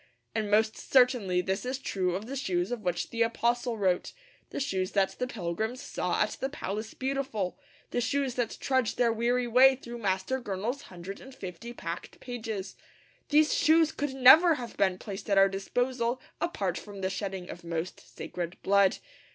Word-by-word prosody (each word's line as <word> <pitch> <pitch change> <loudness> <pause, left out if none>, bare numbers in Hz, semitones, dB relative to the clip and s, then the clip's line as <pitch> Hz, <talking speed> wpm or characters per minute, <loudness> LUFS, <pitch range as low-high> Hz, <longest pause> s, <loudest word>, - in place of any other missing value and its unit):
And 215 -2 -1
most 215 +1 +3
certainly 245 -9 +3
this 190 +2 -2
is 255 +1 -2
true 185 -8 -1
of 200 +3 -4
the 265 +4 -5
shoes 185 -8 -1
of 245 -3 -3
which 180 -3 -2
the 230 -1 -2
apostle 235 +1 +1
wrote, 185 -3 0 0.4
the - - -4
shoes 190 -8 -1
that 195 -2 +3
the 250 - 0
pilgrims 220 +3 -3
saw - - 0
at - - -4
the 265 - 0
Palace 215 -5 -5
Beautiful, 260 -8 -2 0.3
the 245 - 0
shoes 270 +2 0
that 245 -2 -2
trudge 260 -4 +1
their 235 -2 +3
weary 240 +2 +1
way 255 +3 +6
through 240 -2 -8
Master 200 +5 -1
Gurnall's 220 +6 -3
hundred 185 +2 -8
and 265 0 -12
fifty 190 +1 -7
packed 170 -7 -6
pages. 220 -6 -5 0.5
These 300 +1 +4
shoes 320 0 +4
could 285 -3 -3
never 310 +6 +8
have 240 -4 -7
been 190 -2 +2
placed 200 +1 -7
at 200 - +3
our 195 0 +7
disposal 240 +5 -1 0.2
apart 195 - -1
from 200 -2 -10
the 190 - 0
shedding 195 -2 -4
of 175 - -10
most 170 +1 -4
sacred 175 0 -6
blood. 200 -1 +4
225 Hz, 175 wpm, -29 LUFS, 190-255 Hz, 0.5 s, never